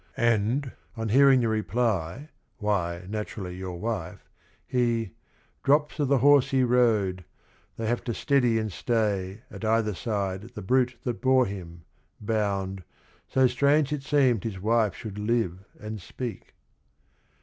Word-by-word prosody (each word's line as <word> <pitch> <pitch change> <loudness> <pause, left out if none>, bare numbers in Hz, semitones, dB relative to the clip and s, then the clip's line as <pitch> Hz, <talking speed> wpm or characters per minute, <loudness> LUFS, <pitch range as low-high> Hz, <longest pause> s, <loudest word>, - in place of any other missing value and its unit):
And 120 +4 +1 0.3
on 115 -1 -2
hearing 135 +2 +6
the 115 - +1
reply, 110 - -1 0.3
"Why, 90 -5 -1
naturally 100 -3 -5
your 90 -1 -6
wife," 105 -6 -4 0.4
he 120 -5 0 0.5
"drops 150 +2 +2
O' 145 - +2
the 140 0 +3
horse 140 +1 +5
he 135 -1 +2
rode, 110 -7 +2 0.3
— - - -35
they 115 - -3
have 120 +2 -1
to 120 - -1
steady 125 -5 +2
and 110 -1 -2
stay, 105 -2 -1
At - - -9
either 110 -1 +2
side 100 +1 -3
the - - -6
brute 125 +3 +2
that 120 -2 -3
bore 130 -1 +4
him, 85 -5 -8 0.4
bound, 100 -3 -2 0.4
So 130 0 +3
strange 140 +3 +3
it 150 - -3
seemed 135 -7 +2
his 105 -5 -4
wife 110 -1 +2
should 105 -2 -7
live 105 -5 0 0.2
and 105 -1 -6
speak 120 +5 -7
115 Hz, 145 wpm, -27 LUFS, 100-125 Hz, 0.5 s, hearing